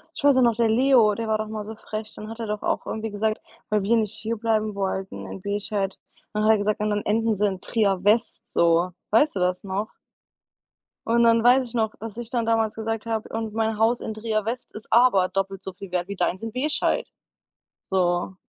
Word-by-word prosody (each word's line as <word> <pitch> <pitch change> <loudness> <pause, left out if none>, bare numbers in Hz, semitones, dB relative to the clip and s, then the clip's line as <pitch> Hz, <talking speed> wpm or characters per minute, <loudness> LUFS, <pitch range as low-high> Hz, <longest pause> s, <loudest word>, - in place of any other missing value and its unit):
Ich - - -7
weiß 285 -2 +6
auch - - +5
noch, 235 -2 +3
der 230 -1 +3
Leo, 235 -2 +4
der 225 0 -4
war 215 0 +2
doch 215 0 -3
mal 215 -1 -5
so 220 +1 -7
frech. 215 0 -6
Dann 215 - -8
hat 225 +1 -8
er 225 - -3
doch 210 0 -3
auch - - -1
irgendwie 220 0 -3
gesagt, 215 +1 -1 0.3
weil 210 -1 +1
wir 230 +4 +3
nicht 215 -1 0
hierbleiben 220 -1 -1
wollten 195 -1 -3
in - - -8
Bescheid, 200 0 -2 0.4
dann 210 0 0
hat 215 - +5
er 220 - +3
gesagt: 205 +1 0
„Und 210 0 0
dann 210 0 -1
enden 225 +1 +1
sie 210 +2 +2
in 190 -2 -2
Trier 200 -5 0
West 220 +3 +1
so.“ 170 +1 +3 0.2
Weißt 260 +4 +3
du - - 0
das 180 +1 0
noch? 200 +2 -3 1.2
Und 235 +1 +3
dann 230 0 +5
weiß 250 +1 +5
ich 240 - -13
noch, 220 -2 0
dass 225 -1 -7
ich 240 -1 -6
dann 240 -2 0
damals 225 -1 +1
gesagt 225 0 -3
habe: 220 -1 -2
„Und 220 -1 -4
mein 220 -1 0
Haus 230 +2 +3
in 220 - -4
Trier 215 -1 -1
West 240 +3 -4
ist 215 0 -11
aber 230 -6 +5
doppelt 195 0 -3
so 190 - -6
viel 190 0 -10
wert 180 0 -2
wie 200 - -5
deins 185 +1 -1
in 225 -1 -4
Bescheid“ 290 +5 0 0.8
so. 180 0 +1
215 Hz, 225 wpm, -24 LUFS, 200-225 Hz, 1.2 s, weiß